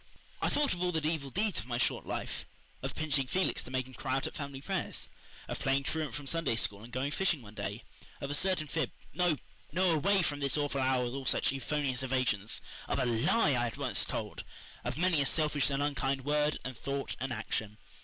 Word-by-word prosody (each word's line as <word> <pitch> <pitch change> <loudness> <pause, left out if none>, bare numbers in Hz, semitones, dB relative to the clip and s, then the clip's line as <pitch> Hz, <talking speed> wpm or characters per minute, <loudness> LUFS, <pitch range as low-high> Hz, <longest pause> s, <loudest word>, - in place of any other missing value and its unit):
I - - +3
thought 290 -1 +3
of 175 - -4
all 180 0 +2
the 160 -3 -1
evil 155 -4 -1
deeds 205 +6 +1
of 105 - -6
my 120 -2 -1
short - - 0
life - - -3 0.3
of 135 +1 -3
pinching 145 -4 +1
Felix 185 +7 +2
to - - -9
make 130 -1 0
him 130 - -13
cry 130 0 -1
out 135 - 0
at - - -3
family 140 -2 -5
prayers, 140 - -2 0.4
of - - -3
playing 135 +1 +2
truant 155 +1 -1
from 145 -1 -5
Sunday 165 -4 +1
School 105 -2 -1
and 120 - -11
going 135 +3 -1
fishing 165 -5 +1
one 105 -1 -11
day, 105 +1 -4 0.4
of 140 0 -3
a - - 0
certain 180 +1 +2
fib 160 +1 0 0.2
no, 180 -3 +3 0.4
no 180 +3 +4
away 190 +5 +4
from 145 -3 0
this 140 +1 +2
awful 145 -2 0
hour 130 -1 +3
with 120 0 -2
all 135 -1 -4
such - - +3
euphonious 135 -1 0
evasions 125 -6 0 0.2
of - - 0
a 130 - +2
LIE 130 - +3
I 120 0 +2
had 115 - -4
once - - +1
told, - - -3 0.4
of - - -2
many 170 -3 +4
a 140 - +2
selfish 150 -4 +3
and 140 0 +1
unkind 135 -2 0
word 150 +1 +2
and 130 0 -3
thought 140 +3 -3
and 130 +1 -2
action. 110 -2 -2
140 Hz, 225 wpm, -32 LUFS, 130-155 Hz, 0.4 s, no